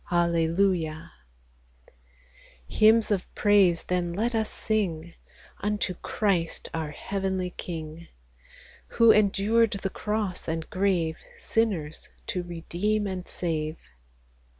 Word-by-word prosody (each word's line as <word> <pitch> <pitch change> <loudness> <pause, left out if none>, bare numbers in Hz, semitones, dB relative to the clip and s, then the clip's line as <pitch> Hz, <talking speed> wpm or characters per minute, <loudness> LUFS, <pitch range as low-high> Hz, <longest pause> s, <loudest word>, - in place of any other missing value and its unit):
Hallelujah! 170 -1 +1 1.6
Hymns 220 0 +4
of 195 -3 0
praise 200 -5 +4
then 175 -1 -1
let 225 +6 -1
us 220 -1 0
sing 175 -6 -2 0.5
Unto 210 -2 -1
Christ 180 -2 -1
our 160 -2 -2
heavenly 190 +3 -3
King, 165 -1 -7 0.9
Who 230 -1 +8
endured 215 +2 +3
the 195 - -1
cross 210 -3 -2
and 160 0 -3
grave, 180 -4 +1 0.2
Sinners 185 -10 -1 0.2
to 200 -6 -2
redeem 175 +5 -2
and 185 -2 -4
save. 155 -2 -2
185 Hz, 100 wpm, -27 LUFS, 165-210 Hz, 1.6 s, Who